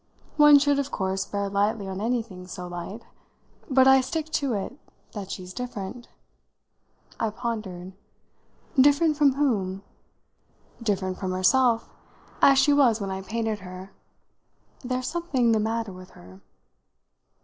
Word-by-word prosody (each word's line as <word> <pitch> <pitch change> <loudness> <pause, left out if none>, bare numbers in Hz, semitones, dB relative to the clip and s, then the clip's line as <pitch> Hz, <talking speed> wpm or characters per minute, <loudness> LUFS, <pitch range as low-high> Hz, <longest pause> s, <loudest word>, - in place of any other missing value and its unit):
One 295 -1 +8
should 285 0 +2
of 280 0 -2
course 190 -4 -2
bear 200 0 -2
lightly 200 +1 0
on 190 +1 -5
anything 225 -6 -3
so 180 -1 -7
light. 175 +5 -7 0.7
But 260 -1 +5
I 265 0 +7
stick 315 +4 -4
to 280 -5 0
it 220 +7 -4 0.3
that 200 -3 -7
she's 185 -1 -7
different." 240 -1 -6 1.1
I 225 - 0
pondered. 210 -6 -5 0.9
"Different 290 +3 +5
from 285 -2 +4
whom?" 200 -9 -1 1.0
"Different 190 -4 -1
from 185 -1 -3
herself 230 +5 +3 0.5
as 275 -1 +6
she 290 +2 +5
was 250 -6 +4
when 195 -2 -4
I 190 0 -4
painted 220 +1 -3
her. 185 0 -10 0.9
There's 255 0 -2
something 295 -9 0
the 220 - +3
matter 225 -1 -2
with 185 0 -12
her." 95 +2 -15
220 Hz, 135 wpm, -25 LUFS, 190-265 Hz, 1.1 s, One